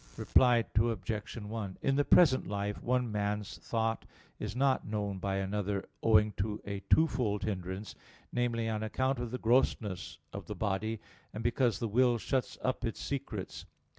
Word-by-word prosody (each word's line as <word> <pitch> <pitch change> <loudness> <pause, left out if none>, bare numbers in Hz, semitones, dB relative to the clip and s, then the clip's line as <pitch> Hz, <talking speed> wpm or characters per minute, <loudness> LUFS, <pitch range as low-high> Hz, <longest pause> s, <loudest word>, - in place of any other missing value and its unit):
Reply 120 -3 +4
Obj. 110 -2 -1
1: 105 -3 -5
In 135 - +2
the 145 - +3
present 140 -4 +5
life 100 +1 -3
one 125 -1 0
man's 105 0 -2
thought 115 -1 -1 0.4
is 105 0 -4
not 135 0 +2
known 100 -2 -2
by 95 +1 -1
another 100 0 -2
owing 105 -1 +5
to 105 +2 -2
a 100 -1 -3
twofold 125 -10 +3
hindrance; 95 0 -4 0.4
namely, 120 -2 0
on 110 -1 -1
account 130 +4 0
of 120 -1 -3
the 125 - -3
grossness 115 -5 +1 0.2
of - - -7
the - - -4
body, 110 +2 -1 0.4
and 110 - -4
because 120 -1 +2
the 115 - -2
will 120 +2 +3
shuts 130 +3 -1
up 130 0 -1
its 115 - -2
secrets. 130 -8 -5
110 Hz, 160 wpm, -32 LUFS, 105-120 Hz, 0.4 s, present